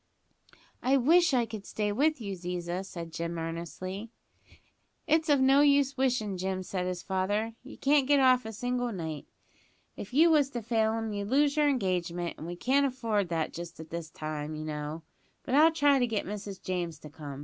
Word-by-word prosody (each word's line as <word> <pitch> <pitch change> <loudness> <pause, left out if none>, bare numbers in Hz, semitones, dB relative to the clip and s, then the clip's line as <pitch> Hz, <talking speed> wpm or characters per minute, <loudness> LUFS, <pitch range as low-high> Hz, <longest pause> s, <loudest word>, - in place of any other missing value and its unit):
"I 265 +2 +3
wish 335 +7 +5
I 245 -3 +2
could 220 -3 -7
stay 210 +1 -2
with 295 +7 +2
you, 200 -4 -4
Ziza," 180 0 -4
said 170 -4 -8
Jim 170 +1 -3
earnestly. 170 +5 -5 1.0
"It's 315 0 +2
of 285 -2 +5
no 270 +2 +5
use 280 -1 +4
wishin', 240 -8 0
Jim," 185 0 -2
said 180 -1 -3
his 180 -1 -4
father, 205 +4 -1
"you 265 - -11
can't 280 -1 +3
get 285 0 +5
off 255 -1 +5
a 220 - -6
single 245 +2 -2
night. 160 -7 -5 0.7
If 200 - -8
you 320 +6 +5
was 290 -3 +4
to 235 - -4
fail 220 -1 +1
'em 225 -1 -3
you'd 205 0 -4
lose 285 +3 +3
your 300 -1 +3
engagement, 180 -8 -1
and 160 - -7
we 175 - -5
can't 275 +9 +2
afford 225 -7 -1
that 165 -2 -1
just 170 -1 -8
at 160 0 -10
this 170 -1 -5
time, 155 -1 -5
you 155 0 -5
know; 150 +1 -5 0.4
but - - -4
I'll 310 +4 +7
try 290 -3 +4
to 245 - +2
get 220 -3 -2
Mrs 200 -1 -6
James 175 -3 -3
to 150 - -11
come. 145 -3 -8
205 Hz, 195 wpm, -29 LUFS, 175-265 Hz, 1.0 s, I'll